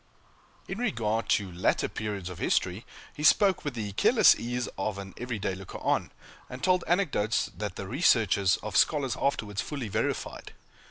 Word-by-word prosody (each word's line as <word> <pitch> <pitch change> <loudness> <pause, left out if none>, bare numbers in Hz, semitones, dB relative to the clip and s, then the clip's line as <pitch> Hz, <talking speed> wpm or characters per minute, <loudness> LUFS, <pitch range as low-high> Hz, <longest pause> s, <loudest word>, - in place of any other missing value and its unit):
In 195 - -5
regard 115 - -1
to 100 -3 +1
later 90 +2 +1
periods 105 -4 -5
of 90 -2 -7
history, 95 +5 0 0.3
he 150 - -9
spoke 190 +4 +4
with 145 -4 -4
the 105 -3 -4
careless 95 - +5
ease 120 +1 -3
of 110 -2 -3
an 95 -1 -8
every 125 -2 -4
day 95 -1 -2
looker 95 0 -8
on; - - 0 0.4
and 125 - -9
told 185 -1 +3
anecdotes 155 - +1
that - - -5
the - - -6
researches 95 -3 +3
of 110 - -5
scholars 140 -5 +2
afterwards 105 -7 -1
fully 140 -7 -5
verified. - - -3
110 Hz, 165 wpm, -28 LUFS, 100-145 Hz, 0.4 s, careless